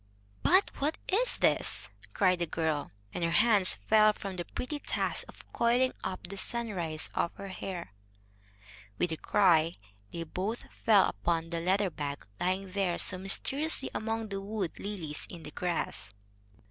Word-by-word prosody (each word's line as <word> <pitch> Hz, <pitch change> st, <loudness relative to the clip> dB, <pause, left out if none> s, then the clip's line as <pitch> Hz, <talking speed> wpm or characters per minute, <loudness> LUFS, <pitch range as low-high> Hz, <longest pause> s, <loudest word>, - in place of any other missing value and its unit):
"But 380 Hz, +2 st, +4 dB
what 300 Hz, +3 st, 0 dB
is 470 Hz, +6 st, +1 dB
this?" -, -, +1 dB, 0.2 s
cried 185 Hz, -3 st, +3 dB
the 170 Hz, -, 0 dB
girl, 155 Hz, -2 st, -1 dB, 0.2 s
and 175 Hz, -, -3 dB
her 170 Hz, -, +2 dB
hands 205 Hz, -, +5 dB
fell 215 Hz, -1 st, +6 dB
from 195 Hz, -2 st, -6 dB
the 175 Hz, -1 st, -4 dB
pretty 290 Hz, +4 st, -4 dB
task -, -, -1 dB
of -, -, -14 dB
coiling 245 Hz, +2 st, +3 dB
up 185 Hz, -, -3 dB
the 195 Hz, +3 st, -5 dB
sunrise 190 Hz, -9 st, -1 dB
of 170 Hz, -, 0 dB
her 200 Hz, 0 st, -7 dB
hair. 185 Hz, -, -6 dB, 1.0 s
With 175 Hz, -, 0 dB
a 160 Hz, -, -2 dB
cry 170 Hz, -4 st, +4 dB, 0.4 s
they 170 Hz, -, -4 dB
both 195 Hz, +8 st, -3 dB
fell 205 Hz, -4 st, +4 dB
upon 165 Hz, +9 st, -1 dB
the 170 Hz, -, -1 dB
leather 190 Hz, +2 st, +1 dB
bag, 145 Hz, -2 st, -5 dB
lying 185 Hz, +1 st, -1 dB
there 190 Hz, -3 st, 0 dB
so 185 Hz, -, +3 dB
mysteriously 270 Hz, +10 st, +2 dB
among 225 Hz, 0 st, -2 dB
the 195 Hz, -1 st, -3 dB
wood 200 Hz, -3 st, -4 dB
lilies 175 Hz, -7 st, -4 dB
in 170 Hz, -2 st, -9 dB
the 150 Hz, -, -8 dB
grass. 150 Hz, -, -2 dB
185 Hz, 160 wpm, -30 LUFS, 170-215 Hz, 1.0 s, fell